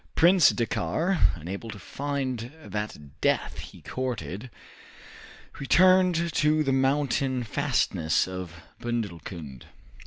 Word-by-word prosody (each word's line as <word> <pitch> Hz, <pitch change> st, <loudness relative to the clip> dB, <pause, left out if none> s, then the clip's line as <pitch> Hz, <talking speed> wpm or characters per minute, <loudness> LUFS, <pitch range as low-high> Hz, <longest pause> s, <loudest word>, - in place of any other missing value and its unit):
Prince 175 Hz, -1 st, +6 dB
Dakkar, 120 Hz, -, 0 dB, 0.2 s
unable 95 Hz, +7 st, -6 dB
to 105 Hz, -, -7 dB
find 130 Hz, -2 st, -3 dB
that 105 Hz, -10 st, -6 dB
death -, -, +1 dB
he -, -, -11 dB
courted, 120 Hz, -, -4 dB, 1.1 s
returned 180 Hz, +2 st, +4 dB
to 155 Hz, +1 st, +3 dB
the 135 Hz, -2 st, +1 dB
mountain 135 Hz, -1 st, +1 dB
fastnesses 110 Hz, -, +1 dB
of 90 Hz, -2 st, -6 dB, 0.3 s
Bundelkund. 85 Hz, -, -5 dB
125 Hz, 95 wpm, -27 LUFS, 95-145 Hz, 1.1 s, Prince